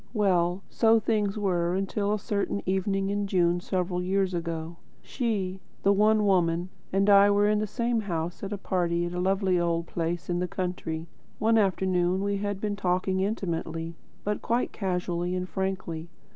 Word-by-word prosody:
Well, 185 -3 +2
so 225 0 +4
things 210 -2 0
were 180 -4 +1
until 200 +1 -1
a 210 - +2
certain 200 0 -2
evening 195 +1 0
in 205 0 -1
June 175 -2 +2
several 180 -1 -1
years 190 +1 0
ago. 165 -1 -4 0.3
She 200 -7 -2 0.2
the 200 - +5
One 210 +1 +4
Woman 175 -2 +2 0.2
and 195 +1 +2
I 200 0 +7
were 205 0 +4
in 210 0 +2
the 215 - -1
same 235 +2 0
house 175 -3 -3 0.2
party 175 -2 0
at 175 - -4
a 180 - -2
lovely 190 0 +2
old 170 -1 0
place 170 0 -3
in 175 -1 0
the 180 - -1
country. 175 -3 -3 0.3
One 225 +1 +3
afternoon 185 -2 +1
we 200 0 0
had 205 -1 -2
been 205 0 -2
talking 185 0 0
intimately, 165 -5 -2 0.3
but 210 0 -2
quite 235 +2 0
casually 180 -2 -2
and 185 0 -2
frankly. 185 -4 -3
190 Hz, 165 wpm, -27 LUFS, 175-205 Hz, 0.3 s, I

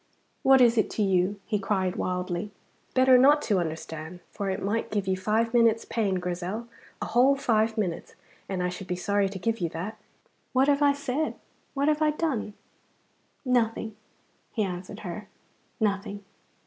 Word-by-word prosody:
What 265 -1 +6
is 235 -2 +5
it - - +1
to 215 - +3
you!" 190 +1 +1
he 210 -2 -1
cried 190 -2 0
wildly. 180 +1 -2 0.5
"Better 255 -1 +6
not 290 +4 +6
to 200 -4 +2
understand, 160 0 -5
for 200 -2 -3
it 190 - -2
might 215 +3 -1
give 205 -2 -2
you 190 - +2
five 220 +5 0
minutes' 230 -2 +4
pain, 205 -5 0
Grizel, 180 +5 -3 0.3
a - - -3
whole 260 +4 +4
five 225 -4 +1
minutes, 185 -6 -3 0.3
and 185 -2 -1
I 180 - +1
should 180 +1 -7
be 180 - -1
sorry 200 +2 +1
to 195 - -6
give 225 +5 -1
you 170 -3 -1
that." 185 +8 -6 0.5
"What 260 +2 +4
have 285 0 +3
I 285 -1 +5
said! 285 +1 -2 0.4
What 280 +1 +1
have 305 0 +2
I 305 - +4
done!" 295 -9 -2 0.9
"Nothing," 225 -3 0 0.6
he 220 - 0
answered 185 +2 -5
her, 195 +2 -6 0.5
"nothing. 200 -1 -1
210 Hz, 170 wpm, -27 LUFS, 185-240 Hz, 0.9 s, What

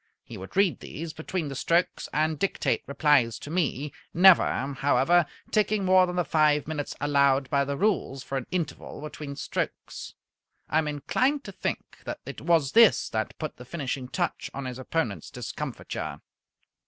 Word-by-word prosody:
He - - -10
would 95 - -9
read 195 -3 +3
these 160 +1 -7
between 160 +1 -3
the 140 - -5
strokes 170 +6 0
and 155 0 0
dictate 195 - 0
replies 140 -5 +3
to 145 - -9
me, 150 -4 -1 0.2
never, 170 -6 +5
however, 170 +4 +3 0.2
taking 210 -1 +2
more 185 0 +5
than 180 - -4
the 180 -1 +1
five 150 -2 +3
minutes 150 -2 -4
allowed 140 -2 +3
by 140 -1 +3
the 140 0 -3
rules 165 -10 0
for 135 - -5
an 130 - -10
interval 175 -3 -4
between 150 -1 -7
strokes. - - -5 0.5
I 155 - +2
am 155 - -1
inclined 255 - 0
to - - -8
think - - -5
that - - -5
it - - -7
was 160 -5 +2
this 230 -2 +5
that 110 0 -3
put 155 -2 -5
the 125 - -10
finishing 130 -2 -4
touch 175 +6 -2
on 140 0 -4
his 125 0 -5
opponents' 130 -5 -2
discomfiture. - - -5
150 Hz, 165 wpm, -27 LUFS, 140-175 Hz, 0.5 s, never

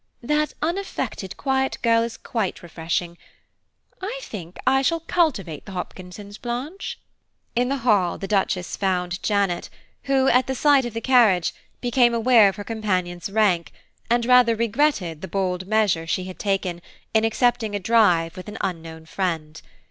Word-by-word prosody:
That 300 +4 0
unaffected 340 - -3
quiet 265 -1 0
girl 230 -1 +4
is 230 0 -3
quite 215 -8 -3
refreshing. 170 +1 -3 0.8
I 425 +6 -4
think 180 - -8
I 265 +1 +4
shall 330 +4 +1
cultivate 245 - -1
the 195 - -8
Hopkinsons, 185 +3 -8
Blanche." 260 +11 -5 0.6
In 245 +1 +1
the 275 - 0
hall, 200 -7 +3
the 195 - -5
Duchess 190 -3 0
found 180 -2 -1
Janet, 200 -4 0 0.4
who, 270 -1 +2
at 250 +1 +4
the 265 - -2
sight 280 -1 +4
of 235 -2 -6
the 230 - -2
carriage, 225 -10 +4 0.3
became 240 -1 +3
aware 230 -3 +6
of 195 - -6
her 205 - -6
companion's 185 -5 -2
rank, 195 -5 +2 0.4
and 235 0 +2
rather 250 -2 +5
regretted 225 - 0
the 190 - -5
bold 185 -2 -2
measure 200 -6 +1
she 185 - -1
had 185 0 -9
taken, 190 -4 -1 0.3
in 220 0 +3
accepting 225 -1 +1
a - - -1
drive 180 -6 +3
with 185 - -9
an - - -7
unknown 165 -2 -5
friend. 160 -4 -3
210 Hz, 155 wpm, -23 LUFS, 180-245 Hz, 0.8 s, aware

